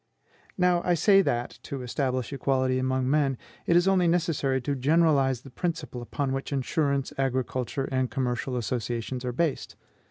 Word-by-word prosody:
Now 180 -1 +3
I 175 - +2
say 195 +4 +5
that, 120 -9 -2
to 135 -2 -6
establish 130 +1 -2
equality 130 -1 +1
among 130 0 0
men, 140 -2 +2 0.3
it 170 - +4
is 175 +2 +4
only 185 -2 +4
necessary 165 -6 +1
to 140 +4 -1
generalize 140 -2 +3
the 135 - -13
principle 160 -5 -3
upon 135 +3 -2
which 135 +2 -4
insurance, 140 0 0
agricultural, 130 0 -1
and 130 -1 0
commercial 125 -1 -2
associations 120 +1 -3
are 125 - -2
based. 150 +4 -1
135 Hz, 155 wpm, -27 LUFS, 130-155 Hz, 0.3 s, say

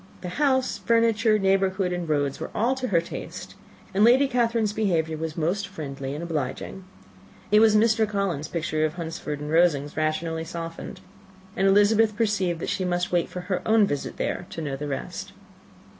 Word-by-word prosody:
The 180 - -5
house, 260 -3 +2
furniture, 230 -1 +3
neighbourhood, 195 -1 +1
and 175 -2 -4
roads, 145 -2 0
were - - -5
all 240 +4 +2
to 260 -1 -3
her 170 -6 +2
taste, 170 - -8 0.4
and 200 +2 +3
Lady 255 +5 +6
Catherine's 230 -4 +1
behaviour 170 -7 0
was 160 +1 -5
most 180 +5 -1
friendly 140 -6 -6
and 155 - -5
obliging. 165 +3 -4 0.7
It 210 - +7
was 220 -1 +5
Mr. 220 0 +3
Collins's 195 -8 -2
picture 160 -2 -1
of 155 +1 0
Hunsford 160 -3 -5
and 150 +1 -5
Rosings 155 -4 +2
rationally 160 +1 -1
softened; 165 0 -7 0.5
and 195 - +2
Elizabeth 205 +2 +4
perceived 200 -7 0
that - - -3
she 190 - -1
must 180 0 -1
wait 175 -1 +1
for 180 - -6
her 180 0 -2
own 220 -1 +4
visit 145 -7 -4
there, 175 - -3
to - - -7
know 145 -4 -3
the 145 +2 -5
rest. 135 -2 -5
180 Hz, 175 wpm, -25 LUFS, 160-215 Hz, 0.7 s, It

